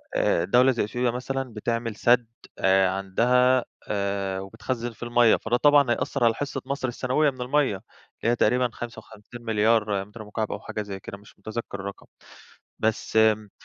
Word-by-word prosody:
آآ 85 - +2
دولة 125 +6 +5
زي 120 - 0
إثيوبيا 120 +3 -1
مثلًا 130 0 -4
بتعمل 115 0 -2
سد 120 0 +3 0.3
آآ 95 0 +4
عندها 125 +6 +2 0.2
آآ 100 -2 -2
وبتخزّن 115 +4 -4
فيه 120 +1 -8
المَيّة، 120 -1 +5
فده 120 +2 0
طبعًا 145 -3 +5
هيأثر 130 +1 -1
على 115 -1 +5
حصة 140 0 -4
مصر 140 -1 -2
السنوية 130 +5 +1
من 130 -2 -8
المَيّة، 130 -2 +1
اللي 115 +4 -6
هي - - +2
تقريبًا 125 +2 +2
55.000.000.000 110 -3 -1
متر 110 +2 -11
مكعب 105 +1 -4
أو - - -4
حاجة 105 - -5
زي 100 -2 -6
كده 100 - -9
مش 100 0 -19
متذكر 110 -1 -6
الرقم، 100 0 -7 0.7
بس 110 0 -1
امم 110 -1 +3
115 Hz, 165 wpm, -25 LUFS, 105-125 Hz, 0.7 s, دولة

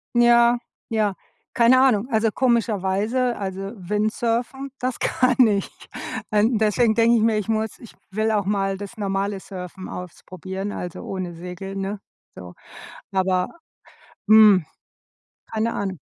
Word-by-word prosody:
Ja, 240 0 +5 0.3
ja, 215 -3 +1 0.4
keine 240 +2 +5
Ahnung. 250 -4 +3
Also, 220 0 +2
komischerweise 230 0 +1
also 195 0 -4
Windsurfen, 230 +7 -2
das 255 0 -2
kann 255 -1 +3
ich. 200 -2 0 0.6
Äh, 210 -1 +3
deswegen 220 0 +2
denke 230 +1 +4
ich - - +1
mir, 220 -1 +3
ich 210 - -3
muss 220 -1 -2
ich 235 - -13 0.2
will 215 +3 0
auch 205 -2 +1
mal 195 -1 0
das 205 +4 -9
normale 200 -1 -2
Surfen 185 -1 -8
ausprobieren, 185 +2 -7
also, 180 -1 -6
ohne 185 -2 -5
Segel, 180 +3 -7
ne? 195 +1 -3 0.4
So. 90 -1 -10 0.6
Aber, 185 -1 +1 0.8
hm, 210 -5 +7 0.9
keine 225 +1 -1
Ahnung. 190 -4 -3
210 Hz, 130 wpm, -23 LUFS, 190-230 Hz, 0.9 s, hm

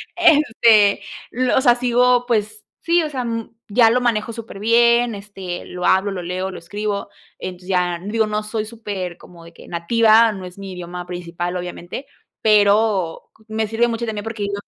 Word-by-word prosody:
este, 235 - +4 0.3
lo 255 +1 +1
o - - +4
sea, 245 -3 +5
sigo, 245 0 +2
pues, 235 - -1 0.2
sí, 340 0 +2
o 310 - -3
sea, 260 -3 -3
mm, 230 -1 -5
ya 225 +2 +5
lo 250 +2 +2
manejo 230 -2 0
súper 230 -3 -9
bien, 235 +2 +4
este, 195 -3 -7
lo 180 0 -5
hablo, 190 +2 +3
lo 190 -3 -5
leo, 185 +2 -3
lo 185 - -8
escribo. 200 +4 -4 0.3
Entonces, 180 0 -8
ya 180 -2 0
digo, 220 +2 0
no 210 0 -2
soy 215 0 -4
súper 205 -6 -6
como 175 -2 -15
de 170 - -14
que - - -15
nativa, 225 +6 +4
no 195 -3 -8
es 180 +1 -11
mi 195 -1 -8
idioma 180 0 -7
principal, 175 0 -5
obviamente, 180 +7 -6 0.3
pero 205 -4 +2
co 220 - -25
me 220 0 -1
sirve 225 +2 +1
mucho 230 0 -3
también 215 -2 -4
porque 225 -1 -5
digo 200 0 -3
210 Hz, 190 wpm, -20 LUFS, 185-230 Hz, 0.3 s, sea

